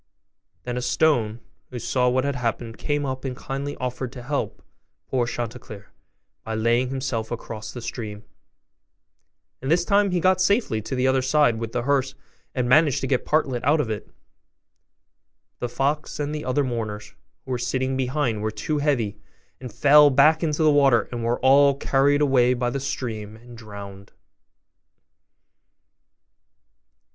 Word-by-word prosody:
Then 125 0 -4
a - - -2
stone, 120 -5 +1 0.3
who 125 - -7
saw 125 +1 +1
what 130 +1 +1
had 140 0 -1
happened, 115 -2 -3
came 145 -1 -1
up 130 -1 -4
and 130 -2 -4
kindly 140 +2 -5
offered 125 0 -4
to 125 - -9
help 140 +3 -3 0.4
poor 125 -3 0
Chanticleer 115 -4 -6 0.5
by 110 - -4
laying 120 +3 +1
himself 130 -4 -3
across 110 -2 -6
the 120 - -8
stream; 105 -3 -6 1.4
and 135 - -4
this 170 +2 +3
time 200 +1 +3
he 180 -1 0
got 185 +1 +3
safely 200 - +1
to 130 - -5
the 125 0 0
other 130 0 +3
side 130 -3 +2
with 115 -1 -4
the 120 0 -2
hearse, 135 0 0 0.4
and 125 -2 0
managed 145 +1 +4
to - - -1
get 130 -3 -1
Partlet 135 -6 0
out 150 +4 +3
of 120 -7 -1
it; 105 - -5
but - - -43
the 125 - -3
fox 145 +5 -2
and 145 0 -2
the 150 - -5
other 130 +3 +1
mourners, 110 -5 -4 0.3
who 130 - -7
were 125 - -1
sitting 130 +2 -1
behind, 130 -4 -1
were 110 - -1
too 110 +8 -3
heavy, 120 -8 0 0.4
and 125 -2 -8
fell 145 +5 +6
back 145 +4 +4
into 155 -1 0
the 155 - +5
water 135 -6 +4
and 120 -1 -4
were 115 +1 0
all 140 +1 +5
carried 140 +1 +2
away 125 -3 +3
by 120 0 -1
the 140 - -2
stream 110 -6 -4
and 120 +2 -14
drowned. 100 -3 -10
130 Hz, 165 wpm, -24 LUFS, 115-145 Hz, 1.4 s, fell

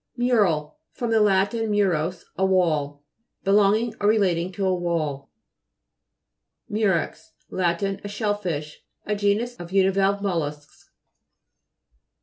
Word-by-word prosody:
MTJ'RAL 205 -12 +2 0.2
fr. 245 - -4
lat. 205 -3 +3
murus, 200 -7 0
a 190 - -1
wall. 155 -7 +1 0.4
Be 195 - +1
longing 210 +3 +3
or 205 - +2
relating 185 -5 +1
to 195 +1 -2
a 185 - +2
wall. 160 -6 -2 1.4
MTJ'REX 170 -6 -1 0.2
Lat. 175 -1 0
A 195 +1 -3
shell 205 0 -1
fish. 160 -7 -5 0.2
A 210 - -1
genus 210 +4 0
of 175 0 -9
univalve 195 +1 +2
mollusks. 150 -6 -4
190 Hz, 115 wpm, -24 LUFS, 170-205 Hz, 1.4 s, lat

